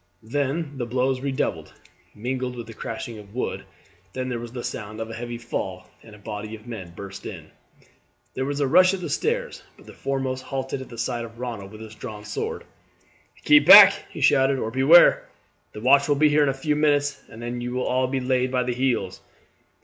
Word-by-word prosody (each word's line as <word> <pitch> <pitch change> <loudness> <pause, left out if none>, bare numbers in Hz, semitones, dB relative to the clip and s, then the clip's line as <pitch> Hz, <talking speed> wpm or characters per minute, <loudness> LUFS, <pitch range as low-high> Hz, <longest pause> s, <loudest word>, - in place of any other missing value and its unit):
Then 140 +4 -2
the 120 - -2
blows 130 +2 0
redoubled, 135 0 -3 0.4
mingled 125 +3 -3
with 120 -1 -7
the 115 - -11
crashing 115 0 -6
of 105 +1 -14
wood; 125 - -3 0.5
then 130 0 -3
there 120 -2 -3
was 120 0 -8
the 120 -1 -6
sound 110 +1 -6
of 110 0 -5
a - - -7
heavy 120 +1 -6
fall, 120 0 -5
and 110 -2 -14
a - - -15
body 105 +1 -7
of 110 0 -15
men 100 -8 -8
burst 100 0 -9
in. - - -9 0.8
There 130 - -2
was 145 +1 -3
a 140 - +1
rush 185 +7 +5
at 185 - -8
the 170 -4 -4
stairs, - - -2 0.2
but - - -18
the - - -12
foremost 135 -1 -3
halted 135 0 -4
at 130 - -10
the 120 - -11
sight 120 +1 -2
of 115 0 -11
Ronald 115 -6 -6
with 110 0 -11
his 110 -1 -10
drawn 105 -2 -9
sword. 105 - -4 0.8
"Keep 150 +1 +5
back," 200 +1 +11 0.2
he - - -9
shouted, 135 -2 +4
"or 110 -3 -3
beware! 140 +8 +6 0.4
The 105 - -8
watch 140 +3 +4
will 145 - +4
be 150 +2 +4
here 150 +1 +3
in 145 - +3
a - - 0
few 150 +2 -1
minutes, 145 -1 +1
and 115 - -12
then 120 +1 -5
you 120 0 -4
will 125 0 -2
all 130 0 +1
be 135 +1 -2
laid 130 0 0
by 125 -1 +1
the 125 0 -2
heels." 120 -7 -1
125 Hz, 215 wpm, -24 LUFS, 115-140 Hz, 0.8 s, back